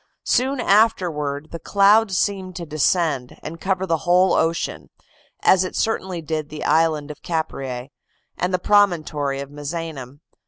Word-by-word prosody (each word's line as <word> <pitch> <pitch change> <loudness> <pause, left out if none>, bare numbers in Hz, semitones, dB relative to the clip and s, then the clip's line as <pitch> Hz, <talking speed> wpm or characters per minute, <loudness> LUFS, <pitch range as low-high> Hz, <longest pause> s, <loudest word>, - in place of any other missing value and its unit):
Soon 260 +2 +1
afterward, 165 -10 +1
the 165 - -6
cloud 205 +3 +4
seemed 190 -1 -1
to 170 - -5
descend, 155 -3 0
and 165 +1 -8
cover 190 0 0
the 165 -3 +1
whole 180 +2 +3
ocean; 165 -1 -1 0.5
as 190 0 +4
it 185 - -5
certainly 190 -6 -2
did 155 -1 -3
the 150 0 -7
island 155 -2 +2
of 150 - -12
Capreae, 135 -6 -4 0.4
and 180 +1 -1
the 185 - +2
promontory 160 -8 +1
of 140 0 -8
Misenum. 145 -2 -6
165 Hz, 145 wpm, -22 LUFS, 150-190 Hz, 0.5 s, cloud